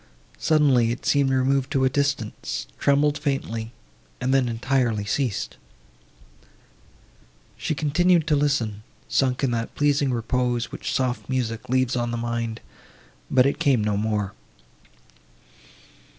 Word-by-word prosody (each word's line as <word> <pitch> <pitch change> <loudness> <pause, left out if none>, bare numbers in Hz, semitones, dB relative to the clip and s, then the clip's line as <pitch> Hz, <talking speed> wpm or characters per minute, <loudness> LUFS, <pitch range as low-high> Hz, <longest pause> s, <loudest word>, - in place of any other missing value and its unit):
Suddenly, 140 -7 +3
it 120 - -6
seemed 140 -2 +3
removed 130 0 +1
to 130 -1 +2
a - - +4
distance, 135 - -2
trembled 145 +1 +2
faintly, 115 -6 -2 0.5
and 130 +1 0
then 130 -3 +3
entirely 115 -3 0
ceased. 115 0 -2 2.0
She 155 - -2
continued 160 +4 +2
to 150 - +2
listen, 130 -8 0 0.3
sunk 130 0 +1
in 130 - +2
that 115 -1 -3
pleasing 145 -2 +2
repose, 120 0 -1
which - - -4
soft 130 -1 -1
music 120 -4 -2
leaves 130 0 +1
on 120 -1 -1
the 120 - -2
mind—but 115 - -3
it 140 - 0
came 130 -6 +3
no 105 -1 0
more. 105 -1 -1
130 Hz, 120 wpm, -24 LUFS, 115-140 Hz, 2.0 s, a